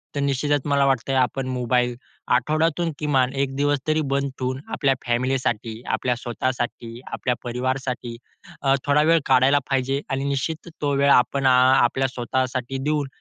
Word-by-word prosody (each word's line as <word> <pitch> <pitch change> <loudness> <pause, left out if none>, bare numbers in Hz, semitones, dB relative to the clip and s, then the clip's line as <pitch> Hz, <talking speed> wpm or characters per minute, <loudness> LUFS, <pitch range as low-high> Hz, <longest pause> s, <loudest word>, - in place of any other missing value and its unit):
तर - - -1
निश्चितच 140 +1 +1
मला 140 -1 +3
वाटतंय, 135 0 0
आपण 130 +1 0
मोबाईल 125 -1 0 0.4
आठवड्यातून 155 +6 +1
किमान 135 -4 +1
1 135 -1 -2
दिवस 145 +1 +1
तरी 155 0 +2
बंद 140 0 0
ठेवून 130 0 -2
आपल्या 135 -1 +2
फॅमिलीसाठी, 120 -2 -1
आपल्या 125 -1 0
स्वतःसाठी, 120 -1 -4
आपल्या 125 - -1
परिवारासाठी 125 0 -3 0.5
अ, 135 -1 +3
थोडा 145 +1 +3
वेळ 165 +1 +4
काढायला 135 +2 +4
पाहिजे 135 +1 0
आणि 135 0 -1
निश्चित 150 +5 -3
तो 145 -1 0
वेळ 140 +1 +3
आपण 135 +2 +3
अ, - - +6
आपल्या 130 0 +4
स्वतःसाठी 130 +1 -2
देऊन 150 -1 0
135 Hz, 150 wpm, -23 LUFS, 125-140 Hz, 0.5 s, अ